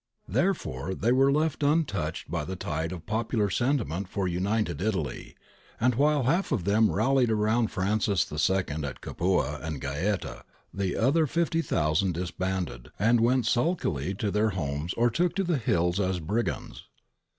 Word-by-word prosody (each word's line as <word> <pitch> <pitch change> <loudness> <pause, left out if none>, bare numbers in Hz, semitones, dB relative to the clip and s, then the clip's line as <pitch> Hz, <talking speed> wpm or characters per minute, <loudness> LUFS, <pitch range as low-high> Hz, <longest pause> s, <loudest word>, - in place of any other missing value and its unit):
Therefore 95 - -1
they 115 +6 +1
were 135 +2 +4
left 155 +1 0
un 155 +3 +3
touched 80 - -4
by - - -1
the 95 +5 -5
tide 80 -1 -3
of 85 -3 -7
popular 110 -2 0
sentiment 105 - 0
for 100 -2 -1
United 95 +4 -1
Italy, 90 - -3 0.4
and 125 +2 +3
while 145 +3 +2
one - - -2
half 170 +9 +1
of 115 -11 0
them 105 +4 +3
rallied 125 +3 +2
round 110 +1 +2
Francis 100 -1 +1
II 80 -1 0
at 70 -2 -5
Capua 85 -4 0
and 80 -3 -4
Gaeta, 75 -1 -2 0.3
the 95 -2 -1
other 145 +7 +3
50,000 100 - +1
disbanded 90 -7 -3
and 115 +3 +3
went 120 +1 +3
sulkily 110 - 0
to 100 +1 -2
their 105 +2 +2
homes 80 -3 -3
or 120 +1 +2
took 175 +6 0
to 195 - +1
the 175 -4 +1
hills 90 -4 +1
as 95 -2 0
brigands. 105 +9 -3
100 Hz, 160 wpm, -27 LUFS, 85-125 Hz, 0.4 s, were